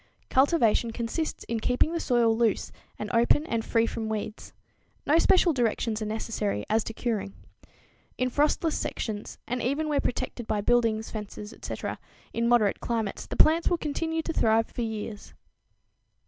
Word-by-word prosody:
Cultivation 260 -5 +3
consists 235 +8 -3
in 230 -1 -2
keeping 250 +8 +1
the 335 - 0
soil 235 -6 +3
loose 225 -3 +1 0.3
and 210 - -4
open 240 +6 +4
and 230 -6 -1
free 230 0 +2
from 225 -1 -3
weeds. 215 0 -5 0.5
No 310 +3 +4
special 360 -1 +4
directions 230 -3 0
are 215 - -2
necessary 215 - -2
as 220 0 +3
to 225 - -5
curing. 215 -5 -2 0.8
In 255 0 0
frostless 300 +3 +2
sections, 210 -2 -4
and 250 +1 -2
even 285 +6 0
where 295 -2 +1
protected 245 -2 -3
by 215 - 0
buildings, 225 -1 +2
fences, 210 0 -7
etc., - - -5 0.3
in 235 0 +1
moderate 225 -5 +3
climates, 225 -4 -2
the - - -5
plants 325 +2 +5
will 350 - +2
continue 320 +1 -2
to 330 - -3
thrive 225 -3 +3
for - - -4
years. 220 -2 -5
230 Hz, 160 wpm, -27 LUFS, 220-280 Hz, 0.8 s, plants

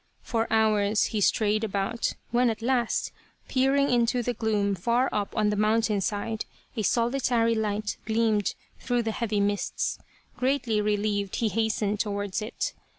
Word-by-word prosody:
For 225 -2 -1
hours 215 -2 +3
he 210 - 0
strayed 215 +2 +2
about, 205 +2 -1 0.2
when 245 +1 +3
at 225 0 -4
last, 245 -2 0 0.4
peering 270 +1 +2
into 240 0 +2
the 245 - -1
gloom 210 -3 0
far 235 +8 +1
up 205 -1 -2
on 210 -1 +3
the - - 0
mountain 215 0 +2
side, 210 +2 -2 0.3
a 225 - -1
solitary 235 +1 +2
light 215 -1 -1
gleamed 220 -2 +1 0.2
through 245 -2 0
the 225 - -1
heavy 215 -2 -1
mists. 200 0 -1 0.4
Greatly 250 -5 +1
re 210 0 +1
lieved 205 -1 -1
he 225 - +1
hastened 210 -1 0
towards 205 -1 -2
it. 235 - -3
220 Hz, 150 wpm, -27 LUFS, 205-235 Hz, 0.4 s, hours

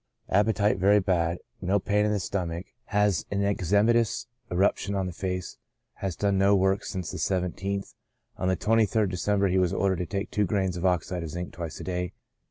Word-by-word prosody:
Appetite 105 0 +2
very 100 +3 +5
bad. 85 -3 +1 0.2
No 95 +2 +2
pain 105 +2 +1
in - - +1
the 105 - +1
stomach. 90 -2 -3 0.2
Has 105 -5 +2
an 100 0 -1
eczematous 100 +4 +2 0.3
eruption 100 +2 +1
on 95 -1 0
the 90 - -4
face. 90 0 -4 0.4
Has 95 -3 -3
done 100 +2 +1
no 100 +1 +5
work 95 +1 +2
since 90 -5 -4
the - - -6
17th 95 +1 -2 0.4
On 90 - -2
the 95 - +2
23rd 110 -2 +2
December 100 +2 +1
he 95 +1 +2
was 90 0 +2
ordered 95 -1 +1
to 90 - -2
take 100 +4 -3
two 105 - +2
grains 95 -2 0
of 90 +1 0
oxide 90 0 0
of 80 - -5
zinc 90 +3 -5
twice 85 -3 -6
a - - -6
day. 90 0 -3
95 Hz, 190 wpm, -27 LUFS, 90-100 Hz, 0.4 s, very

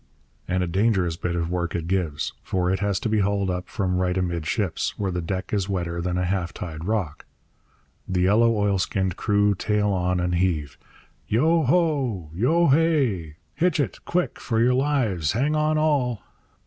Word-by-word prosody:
And 90 0 0
a - - -2
dangerous 95 -2 +1
bit 85 0 -3
of 85 0 -2
work 85 -2 -2
it 85 -2 -2
gives; 85 -5 -1
for 90 -1 -1
it 95 - 0
has 100 -1 0
to - - -1
be 110 -1 +1
hauled 100 -1 +1
up 90 0 -4
from 95 -4 -1
right 90 0 0
amidships, 90 +1 -1
where 100 -2 -1
the 90 0 -2
deck 95 +4 -4
is 100 -2 0
wetter 85 -3 -2
than 90 +1 -1
a 90 - 0
half 90 -2 -2
tide 80 -2 -6
rock. 95 -8 -2 0.8
The 90 -1 0
yellow 105 +6 +4
oilskinned 95 -3 0
crew 105 0 +2
tail 105 +1 0
on 90 -2 0
and 90 0 0
heave. 85 -6 -1 0.5
Yo 160 +9 +3
ho! 135 - +1
Yo 150 - +3
hay! 135 - +2 0.2
'Hitch 170 -1 +1
it! 135 -9 -2
Quick, 180 +1 -1
for 115 -3 -1
your 125 +2 +4
lives, 125 - +1
hang 140 +7 +1
on, 155 0 +2
all!' 135 - +1
95 Hz, 175 wpm, -24 LUFS, 90-115 Hz, 0.8 s, yellow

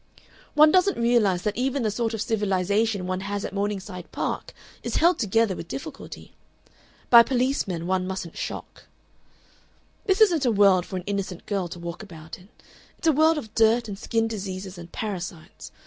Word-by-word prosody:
One 305 +1 +7
doesn't 375 +2 +3
realize 225 -6 +2
that 210 -1 -1
even 260 +2 -1
the 215 - +1
sort 225 +1 -1
of 215 - -2
civilization 205 -1 0
one 185 0 -2
has 200 +1 -4
at - - -6
Morningside 200 -3 -4
Park - - -3 0.3
is - - -4
held 345 +2 +3
together 220 -2 +1
with 170 - -8
difficulty. 270 - -8 0.8
By 235 -1 +11
policemen 245 -9 0
one 185 0 0
mustn't 185 -3 -5
shock. - - -7 1.2
"This 380 +1 +2
isn't 350 -9 +4
a 245 - +3
world 195 -4 +4
for 190 - -6
an 180 - -4
innocent 195 -3 -4
girl 195 -4 -2
to 175 - -8
walk 170 +2 -7
about 160 -6 -10
in. 180 +3 -19 0.5
It's - - -3
a - - +4
world 315 +2 +4
of 220 -7 -7
dirt 225 +1 +3
and 205 - -5
skin 225 0 0
diseases 190 -3 -6
and 170 0 -11
parasites. 175 -6 -6
205 Hz, 175 wpm, -25 LUFS, 185-235 Hz, 1.2 s, By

